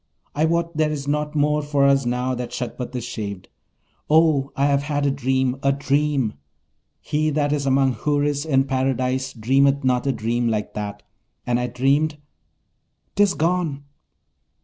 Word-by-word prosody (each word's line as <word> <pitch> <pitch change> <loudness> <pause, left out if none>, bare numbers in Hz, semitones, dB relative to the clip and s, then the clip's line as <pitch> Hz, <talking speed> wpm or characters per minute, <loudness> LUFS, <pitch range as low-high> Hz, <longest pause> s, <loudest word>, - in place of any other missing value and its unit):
I 150 +2 +1
wot 170 0 0
there 155 -1 +2
is 145 -2 -4
nought 150 +1 -1
more 150 0 +2
for 145 -1 +1
us 135 -2 +3
now 125 +1 -1
that 125 -1 -4
Shagpat 125 +1 -5
is 125 - -3
shaved! 100 -5 -6 0.6
Oh, 155 -3 +3
I 140 - +1
have 140 -1 +2
had 145 0 -1
a 140 - +2
dream, 130 -1 0
a 140 - +3
dream! 140 -3 0 0.7
He 155 0 0
that 145 -1 0
is 140 -2 -1
among 135 -1 +3
Houris 145 +1 0
in 135 -4 +2
Paradise 130 -1 -1
dreameth 135 +4 +2
not 130 +1 +1
a - - +3
dream 120 0 -1
like 105 -2 -2
that. 105 -1 -5 0.4
And 120 0 +1
I 125 - -1
dreamed 140 +5 +1 1.0
'tis 205 -1 +3
gone!' 165 -4 0
140 Hz, 160 wpm, -22 LUFS, 125-150 Hz, 1.0 s, us